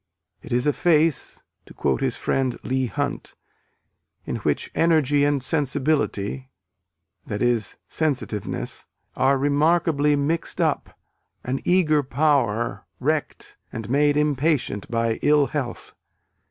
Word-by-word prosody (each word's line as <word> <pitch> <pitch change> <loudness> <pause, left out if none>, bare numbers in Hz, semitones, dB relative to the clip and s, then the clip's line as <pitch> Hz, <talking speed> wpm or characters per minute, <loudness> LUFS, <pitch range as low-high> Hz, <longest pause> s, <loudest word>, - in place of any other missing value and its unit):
"It - - -12
is 125 +2 +1
a 150 - +3
face," 160 -3 +1 0.2
to - - -14
quote - - 0
his 130 -2 0
friend 130 -2 -1
Leigh 130 0 0
Hunt, 145 +3 -4 0.9
"in - - -3
which - - -1
energy 150 -4 +3
and 145 -2 +1
sensibility" 135 -5 0 0.8
(i.e., 120 +3 +1 0.3
sensitiveness) 110 -10 -2 0.3
"are 135 +2 +3
remarkably 150 +1 +2
mixed 150 +4 -1
up - - -1 0.5
an 130 +2 -2
eager 160 -5 +3
power, 135 -6 0
wrecked - - -2
and 115 0 -6
made 145 +1 +3
impatient 150 -7 0
by 115 -1 0
ill 145 -1 +4
health. 135 -6 -5
140 Hz, 115 wpm, -23 LUFS, 125-150 Hz, 0.9 s, ill